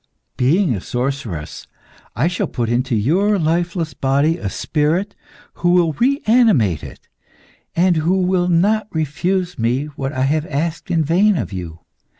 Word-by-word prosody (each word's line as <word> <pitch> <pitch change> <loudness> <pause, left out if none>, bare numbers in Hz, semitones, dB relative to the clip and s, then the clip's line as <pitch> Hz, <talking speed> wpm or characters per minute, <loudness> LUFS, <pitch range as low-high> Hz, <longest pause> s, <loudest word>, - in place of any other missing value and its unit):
Being 155 +5 +2
a 100 - -4
sorceress, 125 - -4 0.5
I 125 +8 +1
shall 175 - -1
put 120 -3 -3
into 125 +1 0
your 185 - +2
lifeless 170 -1 -1
body 140 +5 +1
a 130 - -4
spirit 165 - -1 0.5
who 175 - +2
will 170 -3 +3
reanimate 220 - +2
it, - - -11 0.7
and 175 0 +3
who 170 +5 +1
will 180 -1 +1
not 200 +5 +2
refuse 175 +3 -2
me 120 +5 0
what 135 -1 -3
I 130 -2 -1
have 155 +4 0
asked 155 +3 -3
in 165 -2 +2
vain 185 +6 +3
of 105 - -4
you. 85 -3 -7
160 Hz, 150 wpm, -19 LUFS, 135-180 Hz, 0.7 s, will